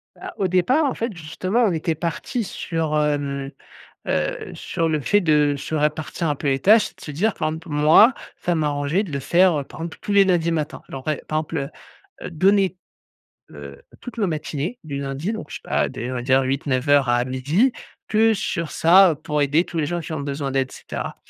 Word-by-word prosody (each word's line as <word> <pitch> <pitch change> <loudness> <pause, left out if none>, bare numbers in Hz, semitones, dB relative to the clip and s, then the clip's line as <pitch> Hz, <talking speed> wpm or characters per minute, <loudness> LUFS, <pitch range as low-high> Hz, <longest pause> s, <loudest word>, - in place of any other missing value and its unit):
Bah 370 -1 -9
au 195 - +1
départ, 250 - +2
en 270 - 0
fait, 225 -4 -3
justement, 185 +9 -1
on 195 - +2
était 160 0 -1
parti 170 - -3
sur, 165 -5 -3
hem, 140 -2 -1 0.6
heu - - -2
heu, - - -2
sur 165 -2 -2
le 155 -1 0
fait 205 +9 +2
de 150 -4 +3
se 155 - -5
répartir 150 +2 -1
un 145 - +1
peu 140 - -3
les 135 0 +2
tâches 215 +2 +5
et - - -28
de - - -21
se 150 - -6
dire, 195 +9 0
par - - -1
exemple, 160 +2 -6
moi, 155 - +6 0.2
ça 175 - -1
m'arrangeait 150 +4 0
de 165 - -9
le 140 - -2
faire, 175 +3 +3
heu, - - -6
par - - -12
exemple, 165 0 -6
tous 205 - -3
les 200 -1 +6
lundis 175 -3 +2
matin. 150 -2 -3
Alors 135 +2 -7
et 155 - -1
par 155 - 0
exemple, 150 -3 -3 0.5
heu, - - -6
donner, 190 +3 +2 0.7
heu, 70 -1 -10 0.2
toutes 245 -2 -9
nos 205 - +2
matinées 155 - -3
du 140 -2 -5
lundi 140 +9 -3
donc 215 -9 -7
je - - -6
sais - - -9
pas, - - 0
dès 120 +2 -5
on - - -4
va 120 - -3
dire 135 +1 +3
08:00-09:00 135 0 +1
à 120 0 +2
12:00 145 - +1 0.4
que 220 +1 +4
sur 170 -5 -3
ça, 180 +2 +6
heu, - - -2
pour 150 +1 -3
aider 150 +5 +2
tous 170 - -6
les 150 - +1
gens 175 +2 -2
qui 160 0 -7
ont 155 - -3
besoin 140 0 -3
d'aide 135 -1 0
et - - -14
cetera. - - -6
155 Hz, 225 wpm, -22 LUFS, 145-185 Hz, 0.7 s, moi